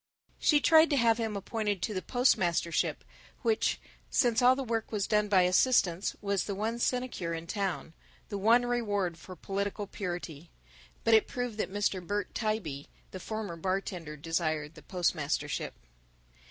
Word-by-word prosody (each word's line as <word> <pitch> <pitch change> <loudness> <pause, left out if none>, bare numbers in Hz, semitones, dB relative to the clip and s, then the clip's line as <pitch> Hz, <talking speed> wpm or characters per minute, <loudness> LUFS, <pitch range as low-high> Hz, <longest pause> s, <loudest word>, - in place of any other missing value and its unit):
She 295 - +4
tried 320 +2 +6
to 285 - +2
have 230 -2 +3
him 220 -3 -2
appointed 210 0 -2
to 215 - -1
the 185 - -2
postmastership, 185 -10 +1 0.4
which, 445 -1 +1 0.3
since 235 -3 +2
all 250 +1 +6
the 270 - -3
work 230 -2 -2
was 205 -3 0
done 210 -1 +2
by 190 -3 +4
assistants, 180 -1 +2
was 200 -2 0
the 200 - -3
one 225 +4 -2
sinecure 240 -10 -1
in 165 0 -6
town, 190 -3 -3 0.4
the 200 - -3
one 230 +4 +4
reward 205 -8 -1
for 185 - -10
political 200 +3 -3
purity. 175 -5 -6 0.5
But 230 - +3
it 220 - +5
proved 245 -3 -4
that 190 - -1
Mr. 205 -2 0
Bert 205 +3 -3
Tybee, 195 -11 -2 0.2
the 185 - -7
former 215 -2 -5
bartender, 180 -3 -3
desired 155 -1 -2
the 155 - -13
postmastership. 155 -5 -1
200 Hz, 155 wpm, -30 LUFS, 175-225 Hz, 0.5 s, tried